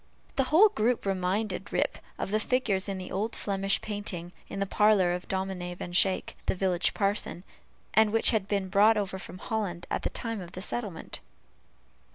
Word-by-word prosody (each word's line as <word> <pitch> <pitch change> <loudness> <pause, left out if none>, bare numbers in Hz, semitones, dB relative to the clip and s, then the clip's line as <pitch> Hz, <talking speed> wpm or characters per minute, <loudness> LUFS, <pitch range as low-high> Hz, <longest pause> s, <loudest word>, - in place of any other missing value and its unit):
The 270 - +2
whole 355 +10 +6
group 235 - 0
reminded 195 +1 -1
Rip - - 0 0.2
of - - -3
the 215 - +2
figures 215 -5 +1
in 195 -1 -3
an 185 - -7
old 215 +4 -2
Flemish 195 -1 0
painting, 200 -5 -1 0.2
in 195 - -5
the 195 - +1
parlor 200 -3 +4
of 180 0 -5
Dominie 190 -2 -3
Van 175 0 -7
Schaick, 185 +1 +2
the - - +1
village 180 -2 +1
parson, 200 -3 -1 0.5
and 220 -1 +5
which 225 +1 +4
had 215 -4 0
been 200 -2 0
brought 210 +3 +5
over 195 -2 -2
from 185 - -8
Holland 185 -5 -3
at - - 0
the - - -1
time 230 -3 -4
of 175 0 -10
the 185 - -6
settlement. 205 -7 -4
195 Hz, 185 wpm, -29 LUFS, 185-215 Hz, 0.5 s, whole